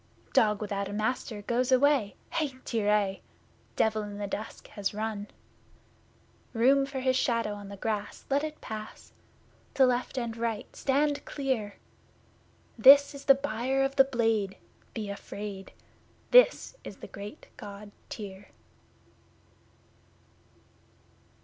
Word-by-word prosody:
Dog 210 -1 +3
without 200 -1 -2
a 200 - -6
Master 215 -1 -2
goes 245 +4 0
away 260 -5 +3 0.2
(Hai, 305 -5 -1
Tyr 220 -3 0
aie!), 200 -2 +1 0.5
Devil 220 -1 +2
in 205 -1 -7
the 205 - -3
Dusk 210 +2 -6
has 205 -1 -3
run! 210 -1 -3 1.3
Then: 225 - -3
Room 275 +2 +5
for 270 -1 -4
his 260 0 +2
shadow 230 -4 +1
on 205 -1 -9
the 200 - -8
grass 210 0 -3
let 280 +2 +1
it 310 0 -5
pass! 215 0 -8 0.6
To 265 - +6
left 250 +1 0
and 235 -2 -2
right 230 -2 -3
stand 285 +2 +1
clear! 255 -8 -2 1.0
This 280 +5 +8
is 280 0 -10
the 275 - +8
Buyer 265 0 -1
of 270 0 -1
the 270 - +8
Blade 225 -6 0 0.4
be 215 -2 -3
afraid! 200 -1 -7 0.6
This - - +5
is - - -9
the - - -9
great 200 +1 -10
God 205 0 -10 0.2
Tyr! 200 -2 -8
225 Hz, 130 wpm, -29 LUFS, 205-270 Hz, 1.3 s, This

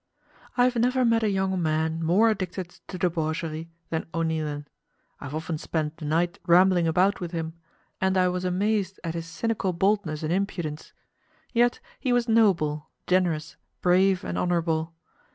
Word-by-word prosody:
I 245 - +5
have 250 -1 +2
never 250 +2 +2
met 230 -1 +3
a 215 - +2
young 190 -2 0
man 160 +1 0
more 200 +8 +4
addicted 185 -3 -4 0.2
to 185 - -6
debauchery 160 -2 -2 0.2
than 160 -1 -2
O'Neilan. 155 -3 -1 0.5
I - - -8
have 140 +2 -5
often 160 0 -3
spent 155 -1 -2
the 155 - -7
night 170 +3 0
rambling 175 0 +5
about 185 +5 +3
with 175 -2 -5
him, 160 -1 -3 0.5
and 190 0 +2
I 185 -1 +4
was 180 0 -1
amazed 195 +1 0
at 165 -2 -3
his 165 -1 -5
cynical 190 +2 -1
boldness 180 -4 0
and 155 +2 0
impudence. 175 -5 -3 0.6
Yet 240 0 +3 0.2
he 255 - -1
was 245 -1 +2
noble, 175 -10 +2 0.2
generous, 170 -4 0 0.3
brave, 185 +1 +4
and - - -3
honourable. 165 -2 0
175 Hz, 160 wpm, -26 LUFS, 160-195 Hz, 0.6 s, I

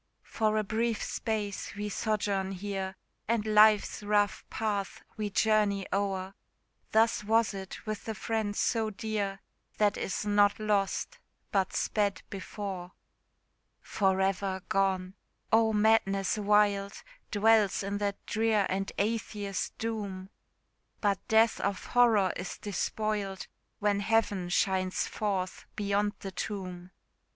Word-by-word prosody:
For 215 -1 0
a 215 - +2
brief 225 +2 -1
space 210 -4 -3
we 205 +1 -3
sojourn 200 -2 -1
here, 190 0 -4 0.3
And 225 -1 +1
life's 215 -1 +5
rough 205 0 +1
path 205 -3 -2
we 210 -1 -2
journey 205 -1 +2
o'er; 195 -1 -1 0.6
Thus 225 0 +3
was 225 +1 +2
it 190 +2 -8
with 215 -1 -4
the 220 - -3
friend 220 -2 -2
so 225 0 +1
dear, 205 -2 -3 0.4
That 205 -2 +2
is 195 - -3
not 205 0 +3
lost, 210 - 0 0.3
but 190 -2 +1
sped 205 -2 0
before. 190 -1 -6 0.9
For 190 -2 +1
ever 190 -1 0
gone! 190 -1 +1 0.4
oh, 225 0 +5
madness 210 -3 +3
wild 205 -1 +2 0.3
Dwells 210 -2 +3
in 200 +1 -2
that 200 -1 -3
drear 220 -2 +2
and 195 +1 -1
Atheist 205 -2 -2
doom! 200 -4 -4 0.7
But 200 -3 +1
death 220 0 +4
of 200 -1 -2
horror 225 -6 +4
is 180 - -5
despoiled, 205 -1 -2 0.3
When 205 -1 +1
Heaven 205 -4 +1
shines 185 0 +1
forth 195 -3 -3
beyond 205 0 0
the 195 - -5
tomb. 185 -2 -5
205 Hz, 120 wpm, -30 LUFS, 195-215 Hz, 0.9 s, life's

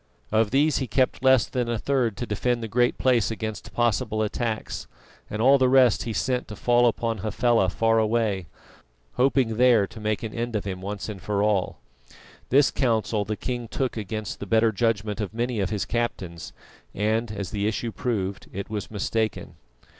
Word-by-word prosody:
Of 110 0 +3
these 145 +5 +2
he 130 - -2
kept 130 0 +1
less 130 -2 +5
than 125 -2 -2
a 120 - 0
third 120 -4 0
to 120 - -3
defend 120 +2 -1
the - - -3
Great 120 +3 +1
Place 125 -4 +2
against 110 -4 -5
possible 110 -2 0
attacks, 110 +1 -3 0.4
and 105 +2 -2
all 135 +2 +6
the 130 -1 +4
rest 130 -3 +4
he 115 - -2
sent 125 +3 -1
to 105 - -8
fall 120 +2 +3
upon 115 -1 -1
Hafela 110 -1 +2
far 115 +4 +2
away, 110 -5 0 0.7
hoping 125 -4 +2
there 120 -4 +5
to 110 - -12
make 110 0 -2
an 110 - -5
end 120 0 -3
of 105 - -2
him 95 -2 -4
once 100 +1 -5
and 105 -4 -7
for 100 -1 0
all. 105 -3 0 0.7
This 140 +2 +4
counsel 110 -4 0
the 110 - -2
king 120 -2 -4
took 130 +3 -2
against 110 -1 -5
the 100 - -6
better 110 +2 +3
judgment 110 -1 -1
of 105 +1 -5
many 120 -1 -1
of 95 -2 0
his 105 -2 -2
captains, 95 -8 -3 0.4
and 110 +2 0
as 100 -3 -5
the 105 -1 -1
issue 115 +2 -2
proved, 100 -5 -3
it 100 +2 -6
was 105 -2 -4
mistaken. 110 +1 -2
110 Hz, 185 wpm, -25 LUFS, 105-120 Hz, 0.7 s, all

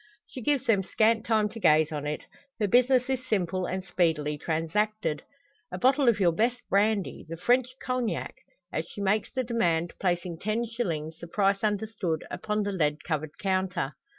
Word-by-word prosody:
She 255 - -9
gives 275 0 +1
them 220 -5 +3
scant 220 +3 +2
time 215 -2 +3
to 225 +2 -9
gaze 155 -5 +4
on 150 -1 -3
it. 150 - -4 0.3
Her 210 - +2
business 250 +3 +4
is 260 -1 -1
simple, 185 -4 -1
and 185 +1 -3
speedily 165 -5 +1
transacted. 165 +3 -1 0.5
"A - - -4
bottle 265 0 +4
of 225 - +2
your 180 -3 +4
best 235 +8 +1
brandy 200 -1 +1
the 165 - -5
French 250 +7 +2
cognac?" 255 -3 -2 0.4
As - - -2
she - - -10
makes 200 +2 +1
the 260 -1 -1
demand, 175 -9 0
placing 175 -2 -1
ten 215 +4 -1
shillings, 165 -9 -3
the 170 - -8
price 195 +2 +1
understood, 210 -6 -1
upon 210 0 -1
the 205 - -2
lead 150 -5 0
covered 155 -2 -3
counter. 185 -7 -1
200 Hz, 175 wpm, -28 LUFS, 165-230 Hz, 0.5 s, gaze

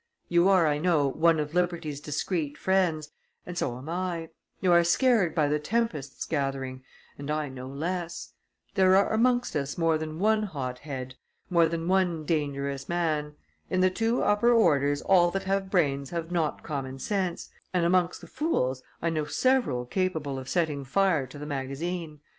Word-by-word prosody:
You 175 +2 +4
are, 185 -4 +5
I 150 -1 +1
know, 155 -4 +2
one 160 +3 +3
of 150 0 -3
liberty's 170 -5 -1
discreet 150 0 -2
friends, 170 -6 +1 0.3
and 180 - -7
so 120 -8 -2
am 130 +4 -10
I; 170 -1 -3 0.3
you 185 - +2
are 170 0 +6
scared 195 - +3
by 150 -3 +3
the 150 +1 +1
tempests 155 - -2
gathering, 135 -3 -3 0.4
and 140 +1 -6
I 150 -1 -1
no 130 -1 -8
less; 170 +5 -4 0.4
there 190 -2 +5
are 200 +2 +3
amongst 245 0 +2
us 140 -1 -2
more 165 -2 +2
than 155 0 -5
one 215 +4 +3
hot 135 -11 -4
head, 130 -3 -6 0.4
more 170 -2 +5
than 165 0 -3
one 180 -4 +1
dangerous 140 -3 -2
man; 155 -4 -1 0.3
in 185 - +1
the 185 0 +4
two 225 +5 0
upper 205 +4 +3
orders 145 - +3
all 175 -2 +5
that 195 +2 -3
have 195 0 -1
brains 140 -7 +1
have 170 0 -4
not 165 -4 -1
common 135 -3 -4
sense, 185 +3 -2 0.2
and 180 -2 +1
amongst 180 0 +2
the - - -11
fools 130 - -1 0.2
I 170 - +1
know 155 -2 -1
several 245 - +1
capable 155 -3 -2
of 130 0 -8
setting 155 -5 0
fire 160 -1 +1
to 130 - -11
the 145 - -7
magazine. 150 +3 -4
165 Hz, 175 wpm, -27 LUFS, 145-185 Hz, 0.4 s, are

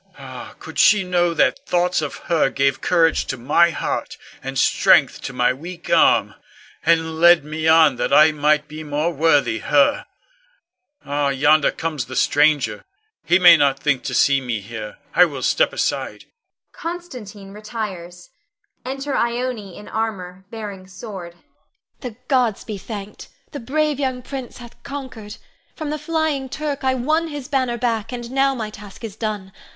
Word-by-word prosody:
Ah, - - -10
could - - -8
she 210 -2 +5
know 175 -1 +1
that 275 - +2
thoughts 180 -1 +1
of 150 - -4
her 165 -5 +2
gave 135 0 0
courage 165 -2 +2
to 130 - -4
my 170 +8 +3
heart, 165 - -4 0.2
and - - -5
strength - - +3
to - - -5
my 125 0 +1
weak 170 +6 -9
arm, - - +4 0.5
and 160 -1 +1
led 170 -2 +6
me 155 +1 -3
on 160 -5 +5
that - - -2
I 155 +2 +7
might 150 0 +1
be 155 +1 -8
more 150 +3 -1
worthy 145 -6 +2
her! 145 -1 +2 1.0
Ah, 145 0 0
yonder 145 +2 +3
comes 155 -6 -3
the 130 - -8
stranger; 150 +1 +2 0.4
he 175 - +4
may 175 -2 +8
not 140 -3 +2
think 140 -2 0
to - - -3
see 140 -1 +3
me 120 -4 -3
here. 105 +1 -8 0.2
I 180 - +6
will 140 -6 -6
step - - +2
aside. - - -3 0.5
[Constantine 250 - -8
retires. 195 -5 -7 0.5
Enter 270 +2 -4
Ione 235 -5 -2
in 210 - -11
armor, 190 -4 -4
bearing 205 -4 -8
sword. 190 -3 -9
Ione. 175 - -31 0.6
The 245 -5 -7
gods 245 -6 +1
be 210 -3 -6
thanked! 205 0 -8 0.2
the 285 - -6
brave 295 +4 -1
young 260 -2 -2
prince 260 -1 -7
hath 240 -1 -13
conquered. 260 -7 -8 0.4
From 310 -2 -5
the 305 - -3
flying 300 -3 -1
Turk 290 -1 -4
I 260 0 +2
won 310 +6 0
his 290 -4 -7
banner 255 -3 0
back, 230 -2 -2
and 240 -1 -6
now 270 0 +2
my 220 -3 -5
task 205 +1 -12
is 215 -3 -6
done. 210 -4 -4
190 Hz, 165 wpm, -21 LUFS, 155-245 Hz, 1.0 s, may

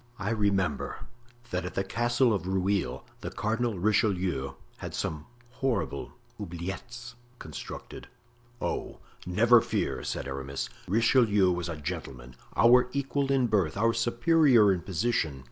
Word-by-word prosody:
"I 105 +1 -2
remember 100 -8 0 0.5
that 90 0 -1
at 90 - -6
the 95 - +1
Castle 120 +3 +2
of 95 -3 -2
Rueil 95 0 0
the - - -5
Cardinal 115 0 -1
Richelieu 95 - +1 0.2
had - - -6
some 75 0 -3 0.2
horrible 130 -1 -2 0.3
'oubliettes' 105 +7 -6 0.2
constructed." 80 -8 -8 0.5
"Oh! - - -3 0.3
never 115 +6 +5
fear," - - -2
said - - -3
Aramis. 70 0 -4 0.2
"Richelieu 105 -2 +4
was 85 -1 -2
a 80 - -4
gentleman, 65 -4 -6 0.2
our 125 +1 +6
equal 140 0 -1
in 135 -2 +3
birth, 100 -7 +1
our 115 +2 +3
superior 120 - +4
in 90 - -3
position. 85 - -1
105 Hz, 130 wpm, -28 LUFS, 90-120 Hz, 0.5 s, our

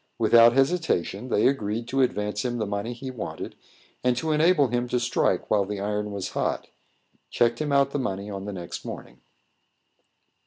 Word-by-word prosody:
Without 115 0 +6
hesitation, 135 - 0
they 105 - +2
agreed 115 -3 -1
to 135 +1 +1
advance 105 -4 0
him 120 -1 -2
the 110 - -1
money 100 +3 -3
he 130 +2 -6
wanted, 125 - -6 0.5
and 125 -1 +2
to 155 +5 -1
enable 155 -3 +4
him 120 +1 -1
to 125 0 0
strike 120 +1 0
while 105 -2 +4
the 100 +1 -5
iron 105 +1 -2
was 100 -2 -4
hot, - - -2 0.6
checked 120 +1 +1
him 150 -1 -1
out 140 0 +3
the 145 - -1
money 100 -5 -3
on 100 -1 -6
the 105 - -4
next 85 -2 -7
morning. 60 +1 -9
120 Hz, 180 wpm, -25 LUFS, 105-130 Hz, 0.6 s, Without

